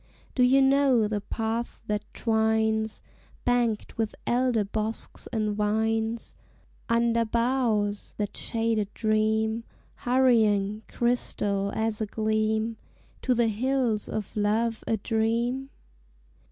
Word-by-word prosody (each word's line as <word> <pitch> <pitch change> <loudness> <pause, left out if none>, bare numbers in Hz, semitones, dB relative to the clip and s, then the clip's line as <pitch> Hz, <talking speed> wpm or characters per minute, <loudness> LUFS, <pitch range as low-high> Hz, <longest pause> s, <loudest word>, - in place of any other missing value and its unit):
Do 255 - 0
you 265 +2 +5
know 270 -4 +4
the 210 -1 -2
path 225 +3 -3
that 210 -1 -3
twines, 220 -1 +1 0.4
Banked 240 -3 0
with 220 -1 -1
elder 245 -2 +2
bosks 215 +2 -4
and 215 -2 -1
vines, 220 +2 0 0.6
Under 230 0 +3
boughs 230 -3 0
that 205 -1 -3
shade 225 -1 -1
a 210 - +1
stream, 220 +1 0 0.3
Hurrying, 220 -5 +3
crystal 205 -5 0
as 220 0 -1
a 215 - 0
gleam, 220 +1 0 0.4
To 255 - +2
the 235 -1 +3
Hills 240 -1 0
of 215 -2 -4
Love 220 +2 0
a 225 - +1
Dream? 235 +5 0
220 Hz, 115 wpm, -27 LUFS, 215-235 Hz, 0.6 s, you